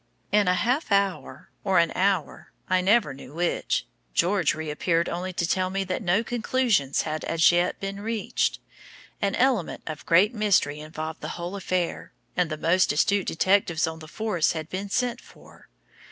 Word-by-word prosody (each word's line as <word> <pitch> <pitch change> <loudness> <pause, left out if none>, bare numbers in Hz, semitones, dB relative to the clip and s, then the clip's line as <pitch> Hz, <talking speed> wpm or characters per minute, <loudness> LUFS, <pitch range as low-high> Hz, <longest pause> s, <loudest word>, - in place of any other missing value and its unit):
In 205 -2 +3
a 180 - +4
half 245 - 0
hour 200 -1 -1
or 195 -2 +2
an 170 -1 +4
hour 190 -4 -1 0.2
I 185 0 +2
never 200 -5 +3
knew 135 +1 -12
which 175 +1 0 0.3
George 180 -3 +2
reappeared 160 +2 0
only 180 +2 -3
to 170 -1 -1
tell 185 +1 0
me 195 +1 -1
that 185 -1 -3
no 190 +3 +2
conclusions 230 - +1
had 155 0 -4
as 165 +1 +4
yet 175 +1 +1
been 195 0 -5
reached; 220 0 -1 0.6
an 200 -1 +1
element 250 -9 +1
of 155 -2 -6
great 185 +7 +5
mystery 200 -9 +2
involved 155 +1 -6
the - - -5
whole 175 +3 -5
affair, 185 -3 -2 0.2
and 180 -2 +1
the 155 - -3
most 180 +4 +3
astute 195 +6 +1
detectives 175 -1 +2
on 160 0 -5
the 155 - -11
force 190 -1 0
had 160 -1 -5
been 195 +2 -4
sent 245 +2 -1
for. - - -18
185 Hz, 170 wpm, -25 LUFS, 165-200 Hz, 0.6 s, great